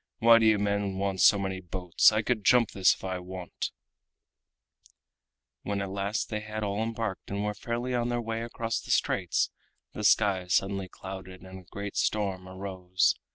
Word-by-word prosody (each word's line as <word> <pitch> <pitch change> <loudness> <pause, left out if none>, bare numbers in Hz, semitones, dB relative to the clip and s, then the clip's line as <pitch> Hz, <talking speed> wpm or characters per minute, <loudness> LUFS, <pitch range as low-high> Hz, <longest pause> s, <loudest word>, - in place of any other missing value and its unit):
Why 115 0 +7
do 110 - +4
you 110 -1 +5
men 100 -1 -1
want 95 -1 -1
so 100 - +7
many 95 -1 -3
boats? 90 +1 +3
I 110 +1 0
could 110 -2 0
jump 120 +2 +4
this 95 -2 +4
if - - -18
I 95 -1 -3
would." 90 0 -8 2.1
When 100 0 -2
at 100 -1 -3
last 100 +2 -2
they 105 - -1
had 110 0 -5
all 100 +1 -1
embarked 115 -3 -3
and 100 +1 -2
were 105 - -1
fairly 120 +4 -3
on 120 -1 0
their 120 0 0
way 115 -1 -3
across 115 -1 -3
the - - -13
straits, - - +1 0.4
the 105 - -5
sky 100 -3 +3
suddenly 95 +1 0
clouded 95 -1 -9
and 95 0 -10
a - - -15
great 100 0 -6
storm 95 -3 -1
arose. 95 -1 0
100 Hz, 180 wpm, -28 LUFS, 95-110 Hz, 2.1 s, Why